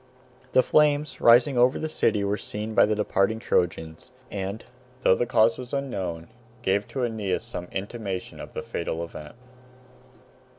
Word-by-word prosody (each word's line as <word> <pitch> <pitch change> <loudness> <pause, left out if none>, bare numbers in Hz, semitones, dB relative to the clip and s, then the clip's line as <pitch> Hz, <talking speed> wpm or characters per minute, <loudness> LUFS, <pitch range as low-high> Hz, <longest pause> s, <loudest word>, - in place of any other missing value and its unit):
The 130 - +6
flames 150 -2 +2
rising 120 +2 +6
over 125 +3 +4
the 155 - -2
city 110 -9 +1
were 100 +1 0
seen 105 +2 -5
by - - +5
the 105 - +1
departing 105 0 +1
Trojans, 80 -6 -1 0.2
and, 100 +2 -4 0.4
though - - +5
the 120 +5 0
cause 115 0 +3
was 125 +1 -8
unknown, 95 -12 -3 0.4
gave 100 0 +1
to 130 - -3
Aeneas 105 -5 -2
some 90 0 -6
intimation 100 -2 -5
of - - -11
the - - -4
fatal 85 0 -3
event. 75 -3 -9
105 Hz, 155 wpm, -26 LUFS, 95-120 Hz, 0.4 s, The